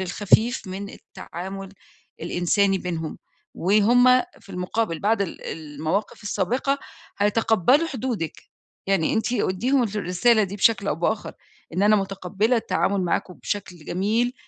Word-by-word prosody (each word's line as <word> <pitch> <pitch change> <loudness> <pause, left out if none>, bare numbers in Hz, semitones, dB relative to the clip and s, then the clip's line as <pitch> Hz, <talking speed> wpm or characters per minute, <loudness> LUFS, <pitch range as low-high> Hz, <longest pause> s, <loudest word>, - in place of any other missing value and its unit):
الخفيف 205 +6 +2
من 200 +2 -6
التعامل 190 +1 -8 0.5
الإنساني 190 +3 +1
بينهم، 165 -3 -4 0.4
وهُم 215 +7 +4 0.3
في - - -16
المقابل 180 -1 -2
بعد 210 0 +2
ال 185 - -6
المواقف 160 +7 -3
السابقة 245 +8 0 0.4
هيتقبلوا 225 - +3
حدودِك. 240 - -4 0.4
يعني 195 -5 +2
أنتِ 225 +2 0
أديهم 245 +5 +1
الرسالة 215 +2 +2
دي 195 +2 -6
بشكل 200 0 +3
أو - - +1
بآخر، 205 +6 -1 0.4
إن 190 - +1
أنا 210 +1 +5
مُتقبلة 195 +4 0
التعامل 200 -3 0
معاكم 180 +1 -1
بشكل 185 -6 -5
جميل، 225 +7 0
200 Hz, 120 wpm, -24 LUFS, 180-225 Hz, 0.5 s, أنا